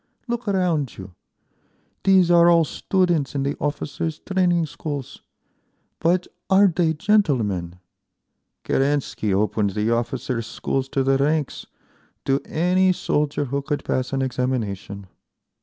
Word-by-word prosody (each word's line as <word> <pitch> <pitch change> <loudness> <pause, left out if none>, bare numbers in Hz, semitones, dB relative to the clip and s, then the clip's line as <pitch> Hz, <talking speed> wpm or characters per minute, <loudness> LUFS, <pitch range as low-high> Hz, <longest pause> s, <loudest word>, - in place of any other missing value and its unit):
Look 240 -1 -3
around 175 - 0
you. 95 -1 -10 0.9
These 190 -3 +5
are 170 0 +6
all 170 -1 +5
students 170 -4 0
in 140 - 0
the 140 +1 -1
officers' 150 +2 -3
training 180 -3 +1
schools. 145 -3 -6 0.8
But 175 +2 +2 0.2
are 195 +1 +6
they 170 -3 +2
gentlemen? 120 - +1 0.9
Kerensky 135 -6 0
opened 100 0 0
the 105 +2 +1
officers' 120 0 -2
schools 135 +3 -3
to 135 - 0
the 135 0 +2
ranks, 150 0 -1 0.6
to 135 +1 +1
any 180 +3 +2
soldier 150 -3 -1
who 140 +2 -2
could 145 +1 -3
pass 130 0 -1
an 135 -1 0
examination. 110 -7 -3
145 Hz, 125 wpm, -22 LUFS, 125-175 Hz, 0.9 s, are